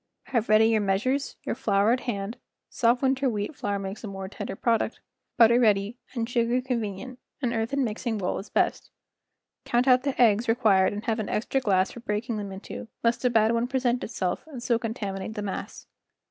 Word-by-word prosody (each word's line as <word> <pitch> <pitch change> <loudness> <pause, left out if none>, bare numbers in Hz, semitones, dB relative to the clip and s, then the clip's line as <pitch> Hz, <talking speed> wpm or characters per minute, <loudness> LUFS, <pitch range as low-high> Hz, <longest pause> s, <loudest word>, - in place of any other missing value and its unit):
Have 235 -5 0
ready 220 +1 +6
your 220 -1 +3
measures, 215 +8 0
your - - -2
flour 210 -3 +2
at 250 - +2
hand 220 -1 -4 0.3
(soft 240 +2 +2
winter 265 0 +2
wheat 210 +5 -3
flour 205 -4 -2
makes 195 +2 -6
a - - -4
more 195 -1 -6
tender 205 0 -6
product), 230 +1 0 0.4
butter 235 +1 +6
ready, 210 0 +2 0.2
and 230 -2 -1
sugar 240 0 +1
con¬ 250 -1 -1
venient—an 240 +4 -5
earthen 235 +5 0
mixing 225 0 -2
bowl 185 -3 -2
is 195 - -9
best. - - 0 0.7
Count 245 +2 +1
out 255 -1 +6
the 275 0 -3
eggs 230 -1 +4
re¬ 225 +1 +2
quired 195 -6 +4
and 205 +2 -6
have 225 0 0
an 215 - -3
extra 265 +5 0
glass 190 -5 +2
for - - -9
breaking 220 +1 -2
them 200 -2 -5
into, 190 +3 -8 0.2
lest 235 +1 +1
a 250 - +4
bad 225 -1 +3
one 235 +1 +1
present 250 -2 0
itself 185 -5 -2
and 265 -6 -8
so 235 -2 +2
contaminate 215 -3 -4
the 210 - -3
mass. 195 - -5
230 Hz, 200 wpm, -26 LUFS, 205-245 Hz, 0.7 s, ready